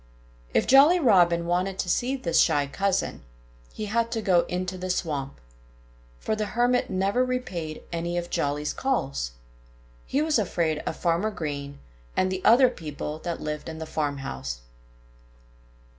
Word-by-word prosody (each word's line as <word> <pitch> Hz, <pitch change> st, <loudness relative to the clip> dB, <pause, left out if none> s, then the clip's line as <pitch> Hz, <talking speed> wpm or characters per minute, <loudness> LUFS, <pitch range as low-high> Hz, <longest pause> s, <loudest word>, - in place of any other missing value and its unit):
If -, -, +2 dB
Jolly 290 Hz, +7 st, +7 dB
Robin 175 Hz, -, +4 dB
wanted 180 Hz, +2 st, 0 dB
to -, -, -2 dB
see 250 Hz, +9 st, +1 dB
this 170 Hz, -11 st, +1 dB
shy 145 Hz, -1 st, +3 dB
cousin, 195 Hz, +7 st, -1 dB, 0.5 s
he 215 Hz, -, -5 dB
had 230 Hz, +2 st, 0 dB
to 225 Hz, -, -1 dB
go 180 Hz, -3 st, +4 dB
into 180 Hz, +1 st, -3 dB
the 185 Hz, 0 st, -5 dB
swamp. 145 Hz, -6 st, -2 dB, 0.8 s
For 215 Hz, -, -2 dB
the 215 Hz, -1 st, -2 dB
Hermit 245 Hz, +1 st, +2 dB
never 195 Hz, +6 st, +1 dB
repaid 185 Hz, -12 st, -4 dB
any 170 Hz, +1 st, -2 dB
of 175 Hz, 0 st, -4 dB
Jolly's 145 Hz, +1 st, -1 dB
calls. 140 Hz, -, -1 dB, 0.7 s
He 285 Hz, +3 st, +1 dB
was 310 Hz, -5 st, +2 dB
afraid 170 Hz, -6 st, 0 dB
of -, -, -2 dB
Farmer 175 Hz, +5 st, +1 dB
Green 140 Hz, -7 st, -5 dB, 0.4 s
and 185 Hz, 0 st, +2 dB
the 185 Hz, 0 st, -3 dB
other 250 Hz, +4 st, +7 dB
people 150 Hz, -, -6 dB
that 170 Hz, 0 st, -4 dB
lived 150 Hz, +1 st, -4 dB
in 160 Hz, -, -7 dB
the 160 Hz, -, -5 dB
farmhouse. 140 Hz, -, -3 dB
180 Hz, 150 wpm, -26 LUFS, 155-220 Hz, 0.8 s, Jolly